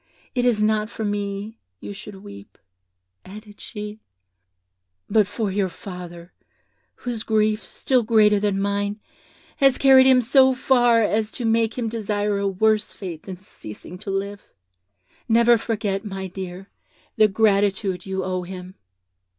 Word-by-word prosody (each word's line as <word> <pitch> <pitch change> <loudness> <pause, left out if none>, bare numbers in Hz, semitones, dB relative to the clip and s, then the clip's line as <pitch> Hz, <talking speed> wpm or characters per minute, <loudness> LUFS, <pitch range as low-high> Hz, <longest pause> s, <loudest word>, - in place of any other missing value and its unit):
It 245 -1 0
is 220 -4 +2
not 215 0 +1
for 220 - -5
me 205 +1 -4 0.2
you 205 - -7
should 205 0 -10
weep,' 100 0 -12 0.7
added 210 +2 -12
she, 210 -1 -7 1.1
'but 210 -2 +3
for 205 0 -3
your 195 -1 0
father, 175 -2 -10 0.6
whose 240 -3 -5
grief, 215 -1 +1
still 255 +5 0
greater 215 -2 +4
than 200 -1 0
mine, 200 +1 -1 0.6
has 270 -2 +4
carried 265 -1 +7
him 260 -1 +6
so 260 +2 +4
far 245 -3 +3
as 215 +1 0
to 245 - -4
make 225 0 +1
him 240 -2 -1
desire 210 -2 -1
a 200 - 0
worse 215 +2 +1
fate 175 -5 -7
than 185 -2 -8
ceasing 180 - -11
to 205 - -8
live. 200 +1 -3 0.9
Never 235 +1 +5
forget, 210 -3 -2
my 195 -2 -5
dear, 185 +1 -8 0.4
the 215 - +5
gratitude 200 -3 +1
you 190 0 -2
owe 185 0 -2
him.' 180 0 -8
210 Hz, 140 wpm, -23 LUFS, 195-225 Hz, 1.1 s, carried